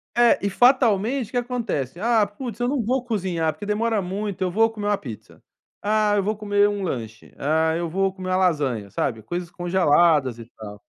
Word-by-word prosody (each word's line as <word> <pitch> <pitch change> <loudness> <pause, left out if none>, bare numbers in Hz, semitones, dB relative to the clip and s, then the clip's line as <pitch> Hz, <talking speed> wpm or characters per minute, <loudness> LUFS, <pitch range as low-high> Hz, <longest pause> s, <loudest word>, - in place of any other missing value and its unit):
é, 240 -1 +5
e - - +1
fatalmente 245 0 +3
o - - -19
que 245 - -2
acontece? 230 - -3
"Ah, 225 0 +3
putz, 230 +2 -7
eu 245 - 0
não 270 -2 0
vou 250 +3 0
cozinhar, 180 -8 -1
porque 155 +7 -9
demora 220 +1 0
muito, 195 +1 -4
eu 180 - -1
vou 225 +4 +3
comer 215 -2 -7
uma 205 - +2
pizza, 110 - -11 0.4
ah, 210 0 +2
eu 205 - +2
vou 215 +1 -1
comer 205 -1 +2
um 205 -1 -3
lanche, 115 - -6
ah, 160 +3 +1
eu 170 0 -2
vou 195 +2 0
comer 185 -1 -6
uma 185 - +2
lasanha." 140 - 0
Sabe? 110 0 -2
Coisas 175 +7 -5
congeladas 170 -7 +2
e 115 - -10
tal. 105 -2 -10
195 Hz, 205 wpm, -23 LUFS, 160-220 Hz, 0.4 s, é